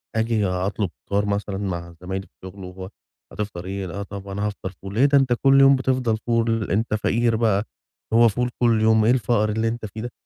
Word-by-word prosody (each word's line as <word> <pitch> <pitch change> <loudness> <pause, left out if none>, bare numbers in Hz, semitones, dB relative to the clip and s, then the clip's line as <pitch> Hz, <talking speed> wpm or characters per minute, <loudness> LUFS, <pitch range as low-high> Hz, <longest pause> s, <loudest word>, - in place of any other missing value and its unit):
آجي 110 -2 +1
أطلب 95 +2 -1 0.2
فطار 100 +1 +1
مثلًا 100 -1 -2
مع 85 -4 -4
زمايلي 95 +2 -5
في - - -40
الشُغل 95 +1 -9
وهو 95 +1 -8 0.4
"هتفطر 100 -4 -5
إيه؟" 95 0 -4
"لأ، 100 +4 -5
طَب 100 0 -9
أنا 100 +1 -3
هافطر 100 -2 -6
فول." 100 0 -7
"ليه؟ 130 +5 +4
ده 140 0 +4
أنت 130 -3 +3
كل 135 0 +6
يوم 135 0 +7
بتفضل 130 -4 0
فول، 115 -2 +1
أنت 110 +2 0
فقير 115 +2 +1
بقى 110 -2 +1 0.5
هو 115 0 +6
فول 125 +4 -1
كل 115 -3 +3
يوم، 110 -1 +4
إيه 120 - +5
الفقر 115 -3 +1
اللي 110 +2 0
أنت 115 -1 -3
فيه 110 +2 -8
ده." 120 0 -5
110 Hz, 210 wpm, -23 LUFS, 100-115 Hz, 0.5 s, يوم